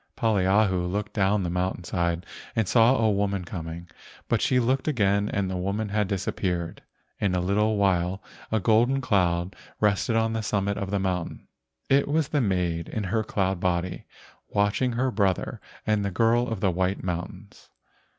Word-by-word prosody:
Poliahu 95 -3 +2
looked 105 +1 -3
down 100 -1 +2
the 90 - -2
mountain 90 0 -1
side 85 0 -1 0.3
and 110 -3 +1
saw 115 +4 +5
a 110 -3 +2
woman 100 -2 -1
coming, 85 -1 -6 0.4
but - - +1
she 125 - +3
looked 130 +4 0
again 100 -7 +2
and 100 -1 -1
the 95 - -3
woman 100 +4 -2
had 105 0 0
disappeared. 90 -3 -2 0.4
In 95 -3 +1
a - - +1
little 105 +4 +1
while 95 -1 +1 0.3
a 110 - +2
golden 115 +7 +3
cloud 90 -7 +1 0.2
rested 105 +2 +2
on 115 0 +1
the 110 - -1
summit 100 -1 -1
of 100 -1 -3
the 100 0 0
mountain. 90 -3 -3 0.4
It 140 +1 +3
was 150 0 +1
the 145 - +1
maid 90 -6 -1
in 110 - -3
her 110 +3 0
cloud 95 -3 -1
body 90 0 -1 0.4
watching 105 +5 +1
her 130 +2 0
brother 100 -4 0 0.2
and 105 -1 +1
the 100 - 0
girl 115 +5 +2
of 115 -5 -4
the 95 - +3
white 95 +2 -1
mountains. 90 +3 -6
100 Hz, 170 wpm, -26 LUFS, 90-110 Hz, 0.4 s, saw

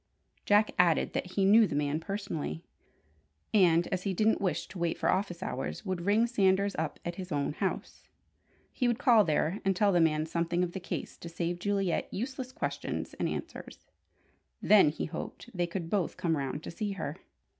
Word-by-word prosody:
Jack 210 +1 +4
added 175 -3 +3
that 180 - -3
he 195 - +2
knew 215 +2 +6
the - - -4
man 145 +1 0
personally, 165 - -4 0.9
and 175 -5 +5
as 185 - -1
he 190 0 -2
didn't 220 +3 +2
wish 190 -3 -1
to 190 - -9
wait 170 -1 0
for - - +2
office 190 -2 -2
hours, - - -4
would 185 -3 -2
ring 215 +3 +4
Sanders 200 -3 +2
up 160 -2 -3
at 175 0 -4
his 185 -1 -7
own 145 -1 -1
house. 190 +4 -3 0.7
He 250 - 0
would 240 -2 +1
call 235 -5 +5
there 160 +3 0
and 195 -1 +1
tell 205 +2 +3
the 175 -2 +3
man 155 -1 +2
something 170 +2 0
of 175 - -2
the 190 - -5
case 180 - -5
to 170 - -8
save 170 +1 -3
Juliet 195 -2 -1
useless 255 +3 -4
questions 300 - -4
and - - 0
answers. - - -7 0.7
Then, 210 -7 +6
he 150 - -4
hoped, 170 +8 -7
they 175 -1 0
could 170 -1 -4
both 185 -1 -1
come 165 -2 0
round 140 +1 -3
to - - -6
see 205 +3 -3
her. 160 -4 -5
185 Hz, 190 wpm, -30 LUFS, 165-205 Hz, 0.9 s, knew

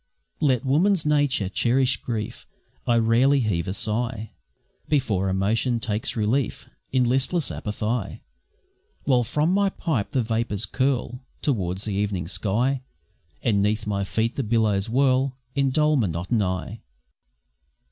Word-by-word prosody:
Let 135 -5 +2
woman's 165 +5 +3
nature 145 -9 +2
cherish 125 +6 +2
grief, 110 -4 -5 0.4
I 120 - +4
rarely 120 +5 +4
heave 100 -8 0
a 95 - -2
sigh 110 0 -2 0.6
Before 105 -10 +1
emotion 110 +6 +1
takes 110 -1 -2
relief 115 +3 -1 0.2
In 130 -1 +3
listless 135 +6 0
apathy; 105 +1 -3 0.8
While 125 -3 +3
from 150 - +1
my 200 0 +3
pipe 155 - -2
the 130 - +2
vapours 115 -2 -1
curl 130 -1 -1 0.2
Towards 95 -8 -1
the 105 - -2
evening 100 -4 -1
sky, 110 +8 0 0.6
And 100 -4 +2
'neath 105 +2 0
my 100 -1 -1
feet 110 +4 -1
the 135 - 0
billows 110 -2 +1
whirl 130 +1 +2 0.2
In 140 0 +2
dull 150 +3 +3
monotony! 95 +1 -1
115 Hz, 125 wpm, -24 LUFS, 105-135 Hz, 0.8 s, I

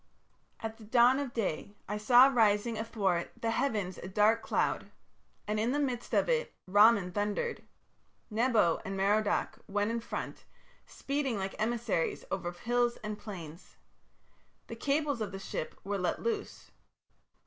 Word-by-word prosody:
"At 225 0 -5
the 225 - -13
dawn 240 +4 +4
of 280 -3 -3
day 200 -3 -3
I 210 - -2
saw 240 +4 +7
rising 225 -3 +3
athwart 205 -6 -1
the 225 - -1
heavens 215 -8 -1
a - - -7
dark 210 +4 +3
cloud, - - -1 0.6
and 210 0 0
in 230 +4 +1
the - - +1
midst 255 -4 -2
of - - +3
it - - 0
Ramman 205 -1 +5
thundered. 210 - -1 0.7
Nebo 220 -6 +2
and 195 0 -4
Merodach 205 +2 +1
went 205 +2 0
in 235 - -1
front, 230 - -6 0.4
speeding 275 -4 -2
like 195 0 -3
emissaries 225 -6 -1
over 180 -2 -2
hills 240 +6 0
and 210 0 -4
plains. 175 -6 -9 0.9
The - - -7
cables 285 -3 0
of 205 -2 -3
the 195 - -6
ship 195 -4 -5
were 200 0 -2
let 180 - -1
loose. 445 -3 -4
215 Hz, 150 wpm, -31 LUFS, 200-240 Hz, 0.9 s, saw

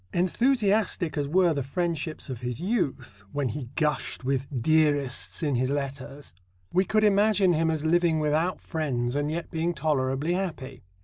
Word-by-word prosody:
Enthusiastic 200 - +1
as 145 -1 -1
were 175 +2 +3
the 140 - -1
friendships 165 +2 -3
of 130 -4 -5
his 125 -1 -4
youth 170 - -2
when 140 -3 0
he 125 +4 -5
gushed 150 -4 -1
into 135 0 0
"dearests" 145 +1 +1
in 145 -2 +1
his 130 +1 +1
letters 140 -1 -5 0.4
we 185 - +4
could 215 +3 +1
imagine 205 -2 +4
him 165 0 +1
as 160 -1 -1
living 170 -1 +3
without 155 +4 0
friends 130 -7 -2
and 145 +1 0
yet 165 +2 -4
being 170 0 -1
tolerably 140 +1 0
happy. 155 -9 -4
155 Hz, 160 wpm, -27 LUFS, 135-175 Hz, 0.4 s, we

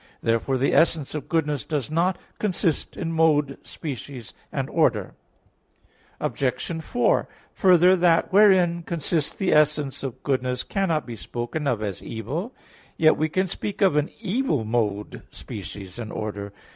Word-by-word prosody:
Therefore 115 +4 +1
the 135 +2 +1
essence 160 -3 +3
of 150 - -5
goodness 150 -4 0
does 150 -2 -3
not 170 +3 +1 0.2
consist 180 -5 -1
in 165 - -3
mode, 150 -4 +2
species 130 - -7 0.2
and - - -2
order. - - +1 1.1
Obj. 140 +5 -2
4: 245 +7 +1 0.2
Further, 180 -2 +5
that 175 -1 +3
wherein 185 -4 +5
consists 165 -2 -1
the 195 - 0
essence 150 -2 +2
of 135 -4 -6
goodness 125 -2 0
cannot 170 -6 0
be 120 - -7
spoken 120 - -4
of 115 -5 0
as 100 -3 -4
evil. 145 - -5 0.4
Yet 155 -1 +5
we 155 +1 0
can 185 +4 +1
speak 195 +3 -4
of 190 -6 +4
an 150 0 +1
evil 210 - 0
mode, 105 -3 -1
species 95 +1 -8
and 110 -2 -5
order. 105 -2 -5
150 Hz, 145 wpm, -24 LUFS, 125-170 Hz, 1.1 s, Further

